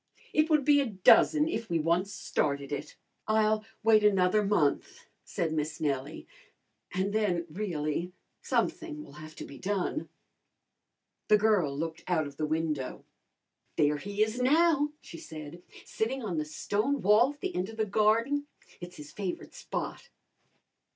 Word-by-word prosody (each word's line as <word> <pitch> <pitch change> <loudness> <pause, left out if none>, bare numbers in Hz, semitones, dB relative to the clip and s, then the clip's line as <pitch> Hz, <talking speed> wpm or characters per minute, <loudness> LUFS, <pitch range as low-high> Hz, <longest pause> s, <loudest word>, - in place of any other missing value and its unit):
"It 310 +1 +3
would 305 -4 +3
be 290 -1 +5
a 275 - -1
dozen, 235 - +5
if 230 -8 -3
we 170 - +1
once 170 +5 +1
started 140 -6 -2
it." 145 +1 -5 0.3
"I'll 215 0 +2 0.2
wait 220 -1 +5
another 200 0 +4
month," 185 -8 0 0.2
said 160 -2 -2
Miss 155 0 -2
Nellie, 145 0 -2 0.7
"and 190 +2 -1
then, 190 -6 +1
really, 170 -2 -2 0.3
something 305 -3 -1
will 150 - -13
have 155 0 -11
to - - -7
be 140 - -11
done." 205 +9 -2 1.2
The 210 - +6
girl 200 -10 +2
looked 165 +1 -4
out 170 -4 +1
of 145 -1 -9
the 155 - -1
window. 155 -4 -2 0.7
"There 150 0 +2
he 205 +6 0
is 220 +3 -2
now," 295 +2 +4
she 165 - -10
said, 155 +2 -9 0.2
"sitting 250 +4 -2
on 180 -7 -2
the 155 - -2
stone 210 - -1
wall 215 +8 +5
at 285 - -30
the - - -3
end 180 +3 -1
of 225 - -10
the 220 - +1
garden. 230 +8 +2 0.3
It's 175 0 -9
his 150 -1 -10
favourite 190 -4 -5
spot." 485 - -5
195 Hz, 155 wpm, -29 LUFS, 155-220 Hz, 1.2 s, The